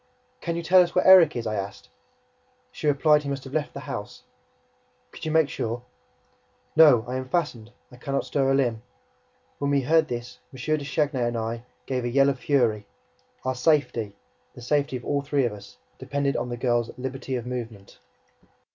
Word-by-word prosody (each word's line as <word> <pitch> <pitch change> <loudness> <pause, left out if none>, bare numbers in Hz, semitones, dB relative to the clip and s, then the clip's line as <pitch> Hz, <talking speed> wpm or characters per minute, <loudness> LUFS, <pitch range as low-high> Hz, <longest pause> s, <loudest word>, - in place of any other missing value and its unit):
"Can 170 -1 -2
you 170 - -3
tell 180 +2 +6
us 175 - -1
where 180 - +3
Erik 185 -5 +8
is?" 120 -1 -3
I 110 - -2
asked. 100 -1 -5 0.8
She - - -4
replied 150 +1 +4
that - - -11
he - - -3
must 135 -1 -4
have 135 - -10
left 155 -1 -2
the 140 - -6
house. 105 -5 -7 0.9
"Could - - -9
you 155 - -1
make 160 -2 +4
sure?" 120 -2 -4 0.9
"No. 145 -8 +7
I 125 +1 -3
am 130 0 -6
fastened. 130 -10 -2 0.2
I 125 - -13
can 140 +2 -4
not - - 0
stir 135 -2 0
a 135 - +3
limb." 120 -5 0 0.8
When 140 - -1
we 140 -1 +2
heard 160 +4 +3
this, 120 -2 -6
M. 130 - -12 0.2
de 145 - -6
Chagny 140 -1 -1
and 120 0 0
I 115 +1 -4 0.2
gave 130 -2 -2
a 120 - -1
yell 135 +3 +4
of 135 -2 -2
fury. 115 -8 +1 0.6
Our 130 - 0
safety, 125 -7 +1 0.4
the 120 - -11
safety 140 +1 0
of 125 - -12
all 145 -1 0
three 140 -1 0
of 115 - -2
us, 100 -1 -13 0.2
depended 140 -1 -1
on 125 - -2
the 120 - -4
girl's 120 -1 0
liberty 130 +1 -4
of 120 -2 -4
movement. 115 -5 -7
130 Hz, 200 wpm, -25 LUFS, 120-145 Hz, 0.9 s, Erik